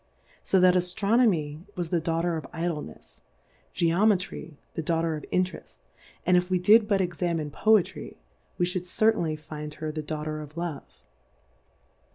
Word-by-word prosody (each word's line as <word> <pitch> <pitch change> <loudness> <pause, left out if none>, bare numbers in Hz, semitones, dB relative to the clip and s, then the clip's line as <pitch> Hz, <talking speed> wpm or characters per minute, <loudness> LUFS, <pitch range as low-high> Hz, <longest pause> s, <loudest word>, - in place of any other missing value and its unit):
So 190 - +3
that 180 0 +6
Aftronomj 180 -3 +1
was 175 -3 -3
the 170 -1 +1
Daughter 165 +1 0
of 160 - -5
Idlenefs^ 165 - -5 0.6
Geometry 180 -2 +1 0.2
the - - -3
Daughter 165 0 0
of 150 - -7
J/^ - - -21 0.2
terefi 185 - -12 0.2
\ - - -27
and 180 - +4
if 180 +1 +2
We 185 - +2
did 210 +4 +5
but 200 -2 +2
examine 170 -3 -2
Voe^ 215 +4 +4
try^ - - -10 0.4
we 175 - +2
fliould 180 0 -3
certainly 180 -5 +1
find 150 0 -8
her 155 -1 -4
the 155 0 -4
Daughter 155 0 -4
of 150 +2 -11
Love. 170 -3 -6
170 Hz, 160 wpm, -27 LUFS, 155-185 Hz, 0.6 s, that